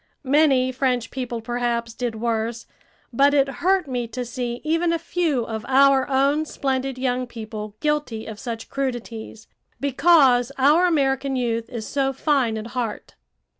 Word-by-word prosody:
Many 265 -2 +3
French 250 -3 -1
people 245 -3 -4
perhaps 235 0 -2
did 240 -1 -3
worse, 230 0 -2 0.5
but 280 +4 +4
it 275 -1 +4
hurt 375 -2 +2
me 245 -3 -2
to 245 +2 -5
see 240 0 -4
even 330 +2 +1
a 335 - +1
few 325 -7 -1
of 220 -1 -5
our 270 0 +4
own 280 +3 +2
splendid 270 -3 -2
young 255 -1 -1
people 215 -2 -7
guilty 295 -7 -1
of 215 -2 -8
such 230 -3 -6
crudities, 240 -4 -5 0.3
because 275 -3 +4
our 300 +7 +5
American 275 -4 +1
youth 230 -2 -1
is 230 -4 -5
so 270 -1 0
fine 265 -5 +1
at 215 +1 -6
heart. 240 -4 -4
255 Hz, 150 wpm, -23 LUFS, 235-275 Hz, 0.5 s, our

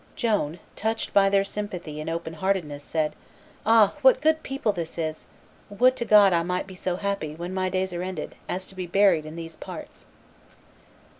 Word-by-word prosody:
Joan, 205 - 0 0.2
touched 225 +1 -2
by 195 -1 +5
their 195 0 +3
sympathy 185 -7 -5
and 155 - -4
open 165 0 -4
heartedness, 160 -5 -1
said, 155 0 -1 0.5
"Ah! 225 -3 +6
what 265 -2 +7
a - - -18
good 315 +1 +2
people 270 -7 -1
is 170 -3 -5
this! 155 -2 -4 0.4
Would 250 +6 +4
to 235 - -2
God 205 -4 +7
I 170 - +3
might 180 +2 -2
be 190 - -11
so 180 -1 -2
happy, 195 -6 -3
when 175 +3 -5
my 185 0 0
days 185 0 -1
are 175 - -3
ended, 185 -4 -5 0.2
as 185 +1 -3
to - - -12
be 185 -1 -4
buried 175 -4 +3
in 155 - -8
these 165 -1 -7
parts!" - - -9
185 Hz, 195 wpm, -25 LUFS, 165-205 Hz, 0.5 s, what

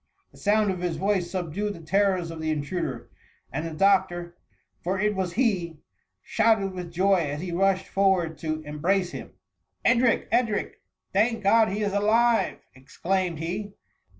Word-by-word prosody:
The - - -18
sound 210 -1 +2
of 185 - -4
his 175 -2 -2
voice 190 -1 0
subdued 190 +3 -3
the - - -10
terrors 185 0 +1
of 160 -1 -7
the 160 - -2
intruder, 145 -5 -3 0.4
and - - -2
the 165 - -6
doctor, 175 -1 +2 0.5
for 190 +2 -1
it 210 +1 +1
was 190 -3 -2
he, 185 -9 0 0.5
shouted 200 -4 +2
with 180 -2 -6
joy, 190 +3 +3
as 150 -4 -2
he 180 -1 -4
rushed 190 +2 +1
forward 185 -5 +1
to 155 -1 -3
eni 150 0 -8
brace 185 +1 +1
him. - - -8 0.5
"Edric! 240 -1 +3
Edric! 230 -3 0 0.3
thank 225 +3 +1
God 220 +3 +5
he 210 +2 -2
is 200 -1 -1
alive 225 +3 +2 0.2
P' 130 - -17
exclaimed 180 +4 -2
he. 185 +6 -4
190 Hz, 165 wpm, -26 LUFS, 170-205 Hz, 0.5 s, God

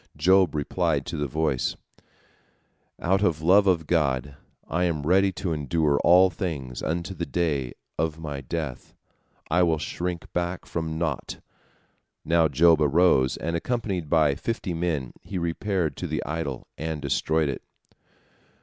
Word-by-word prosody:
Job 90 +1 +4
replied 75 -1 0
to 85 - -5
the 75 -2 -1
voice: 75 -2 0 1.2
"Out 95 +3 +1
of 80 -6 +1
love 100 +4 +5
of 85 -4 +2
God 70 -5 0 0.3
I 90 +3 0
am 80 -4 -1
ready 95 +4 +4
to 85 -2 -2
endure 75 0 +1
all 90 +2 +6
things 70 -11 -4
unto 85 +4 -2
the 85 -2 -4
day 75 -8 -1 0.3
of 80 0 0
my 75 -4 -5
death. 75 -1 -5 0.6
I 90 - +4
will 85 -2 +3
shrink 85 +2 -4
back 90 +1 -2
from 80 -1 -3
naught." 80 -3 -3 0.9
Now 80 0 +4
Job 80 +2 +4
arose, 75 -3 +3
and 85 +1 -3
accompanied 95 -4 -2
by 75 -3 +4
fifty 100 +2 -3
men 80 -7 -2
he 95 - -6
repaired 85 0 -1
to - - -4
the - - -3
idol, 75 -3 -4
and 80 0 -3
destroyed 75 +2 0
it. 70 - -4
80 Hz, 145 wpm, -25 LUFS, 75-90 Hz, 1.2 s, all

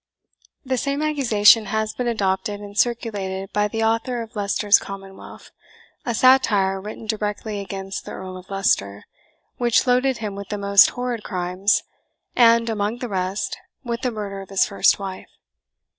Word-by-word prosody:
] - - -36
The 260 -1 -1
same 280 +3 -1
accusation 230 -8 +4
has 220 0 -1
been 250 - -3
adopted 205 -1 -1
and 205 -1 -10
circulated 200 -5 -2
by 210 0 +2
the 225 +2 -2
author 230 +2 0
of 230 +2 -14
Leicester's 205 0 +3
Commonwealth, 195 -1 -10 0.6
a 240 - 0
satire 205 -7 +3
written 215 +2 -8
directly 210 -1 -3
against 195 0 -6
the - - -7
Earl 185 0 -7
of 185 0 -12
Leicester, 105 - 0 0.5
which 240 0 +2
loaded 255 +1 +2
him 215 -2 -4
with 200 0 -8
the 210 - -3
most 200 0 +6
horrid 245 -2 -4
crimes, 185 +2 0 0.5
and, 230 -1 +5
among 215 0 -1
the 245 -1 -5
rest, 190 0 -2 0.2
with 235 -1 -4
the 255 - 0
murder 205 -3 -5
of 195 - -12
his 195 -1 +2
first 200 - +3
wife. 195 -2 -7
210 Hz, 160 wpm, -22 LUFS, 195-235 Hz, 0.6 s, most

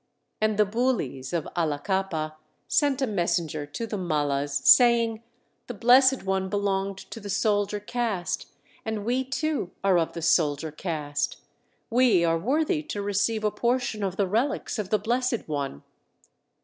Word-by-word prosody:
And 215 -1 +1
the 210 - +5
Bulis 205 - -1
of 170 -3 -2
Allakappa 160 0 -1 0.3
sent 280 -2 +2
a - - +4
messenger 170 - -1
to 145 +11 -5
the 215 -3 -4
Mallas, 145 -4 0
saying, 235 -2 +5 0.5
"The 245 - -6
Blessed 255 +4 +5
One 190 0 -1
belonged 195 -1 -1
to 225 - -6
the 205 -1 -8
soldier 205 0 +1
caste, 210 -4 -2 0.4
and 220 -2 -4
we 250 +3 +1
too 275 - -2
are 190 -3 +4
of 165 - -1
the 170 - -6
soldier 155 -2 +2
caste. 150 -3 -3 0.5
We 230 -8 +4
are 165 0 +2
worthy 305 - +1
to 300 -9 -6
receive 205 +2 0
a 210 - +2
portion 240 -2 -1
of 190 -2 -2
the 200 - +1
relics 230 +5 -1
of 200 -3 -3
the 215 - +3
Blessed 240 +3 -1
One. 140 - -4
205 Hz, 150 wpm, -26 LUFS, 170-235 Hz, 0.5 s, the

